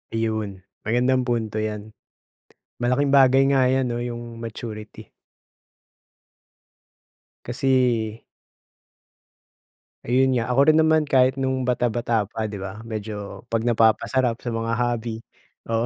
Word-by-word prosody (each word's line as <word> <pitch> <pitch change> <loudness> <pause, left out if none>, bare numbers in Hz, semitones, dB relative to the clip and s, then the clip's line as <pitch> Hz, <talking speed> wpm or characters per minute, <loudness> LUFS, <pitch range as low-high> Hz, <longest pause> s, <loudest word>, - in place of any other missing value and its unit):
Iyon, 110 -4 -2 0.2
magandang 125 +2 +2
punto 110 -3 -1
'yan. 110 0 -4 0.9
Malaking 125 +4 +1
bagay 135 -1 +5
nga 135 -2 +3
'yan, 130 -1 +1
'no, 120 - -3
'yong 120 -1 -6
maturity. 110 -1 -8 2.4
Kasi 120 -4 0 1.8
Ayun 130 +1 +2
nga, 115 - 0
ako 135 - +2
rin 155 - +5
naman 160 -1 +4
kahit 130 0 +3
no'ng 130 -1 -1
bata-bata 120 -3 0
pa, 110 0 -3
'di 100 -2 -6
ba, 100 +4 -7
medyo 105 -2 -6
'pag 115 0 -1
napapasarap 115 +1 +2
sa 120 -1 -5
mga 115 0 -2
hobby, 120 -2 -2 0.4
oh. 115 +1 0
120 Hz, 115 wpm, -23 LUFS, 110-130 Hz, 2.4 s, bagay